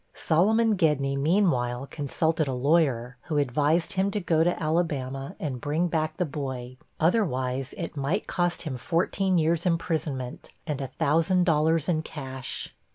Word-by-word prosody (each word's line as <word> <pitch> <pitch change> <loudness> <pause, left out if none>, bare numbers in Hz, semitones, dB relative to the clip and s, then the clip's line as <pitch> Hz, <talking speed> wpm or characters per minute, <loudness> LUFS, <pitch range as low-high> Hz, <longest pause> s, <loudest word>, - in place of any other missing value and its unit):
Solomon 215 +7 +3
Gedney, 145 -5 +2
meanwhile, 140 -6 +1
consulted 155 +2 -1
a 130 - -1
lawyer, 125 -4 +1
who 155 -3 -1
advised 145 +7 +1
him 190 +1 +1
to 210 - -1
go 165 -4 +2
to 175 +1 0
Alabama 145 -5 -1
and 130 -5 -4
bring 155 +4 0
back 155 -1 -1
the 180 - +1
boy, 130 -4 -5 0.2
otherwise 135 - 0
it 170 -3 -5
might 145 +9 -1
cost 175 -1 -1
him 145 -6 -4
fourteen 180 +6 +1
years' 165 +2 +2
imprisonment, 160 -7 -2
and 150 -4 -3
a 135 - -3
thousand 165 +7 +2
dollars 160 -1 +2
in 160 -3 +1
cash. 135 -4 -6
155 Hz, 150 wpm, -27 LUFS, 135-170 Hz, 0.2 s, Solomon